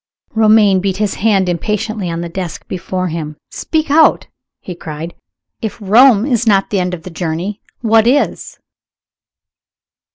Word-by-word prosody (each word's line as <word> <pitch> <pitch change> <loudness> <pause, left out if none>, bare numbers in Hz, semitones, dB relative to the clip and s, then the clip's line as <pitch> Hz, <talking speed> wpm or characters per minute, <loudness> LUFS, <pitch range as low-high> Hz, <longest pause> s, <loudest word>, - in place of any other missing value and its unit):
Romayne 215 -3 +4
beat 190 0 -2
his 210 -2 -1
hand 200 -3 +1
impatiently 210 +2 -2
on 165 0 -3
the 170 - -4
desk 175 0 -6
before 185 0 -3
him. 155 -2 -5
"Speak 315 -2 -2
out!" 315 +2 +4 0.3
he 180 - -8
cried. 165 0 -7 0.5
"If 220 - -4
Rome 220 +2 +5
is 240 -4 0
not 195 -2 +2
the 200 - +1
end 180 0 -1
of 160 - -14
the 185 - -9
journey 175 +5 -4 0.2
what 225 -1 +3
is?" 285 +4 0
195 Hz, 150 wpm, -15 LUFS, 175-220 Hz, 0.5 s, Rome